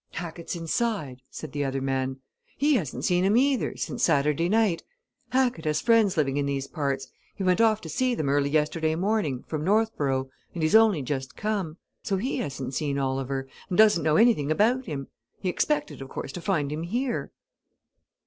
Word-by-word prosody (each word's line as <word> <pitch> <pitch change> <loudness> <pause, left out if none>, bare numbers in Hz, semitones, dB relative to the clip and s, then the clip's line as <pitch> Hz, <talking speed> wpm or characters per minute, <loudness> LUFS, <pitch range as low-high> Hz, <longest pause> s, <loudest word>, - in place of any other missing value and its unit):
"Hackett's 170 +1 -5
inside," 165 - -2
said 155 - -8
the 145 +1 -2
other 135 0 -1
man. 135 0 -2 0.4
"He 295 +2 +3
hasn't 145 - -1
seen 180 0 +2
him 200 +4 +3
either, 270 0 +1
since 135 -7 -4
Saturday 150 +4 +2
night. 210 -5 +2 0.5
Hackett 250 -10 +1
has 150 -1 +1
friends 225 -6 +3
living 140 -2 +1
in 140 -1 0
these 135 -1 -2
parts 140 -4 -2 0.3
he 195 - -4
went 185 +3 +3
off 220 -1 +3
to - - -8
see 250 - 0
them 155 - -2
early 140 0 +2
yesterday 155 +1 +1
morning, 175 - 0
from 155 -2 -3
Northborough, 150 -10 +1 0.2
and 165 - -2
he's 155 - +1
only 220 -9 +5
just 130 -1 -4
come. 200 -7 -2 0.2
So 195 - -1
he 250 +8 -2
hasn't 135 -2 -4
seen 140 0 -1
Oliver, 135 0 -2 0.2
and 180 - -1
doesn't 210 -6 +6
know 155 0 +2
anything 215 -11 +4
about 240 +9 +2
him; 140 -3 -4 0.3
he 185 - -1
expected, 180 - -1
of 135 - -8
course, - - -6
to 175 - -7
find 160 -7 0
him 155 +1 -3
here." 235 +8 -2
160 Hz, 185 wpm, -26 LUFS, 140-215 Hz, 0.5 s, doesn't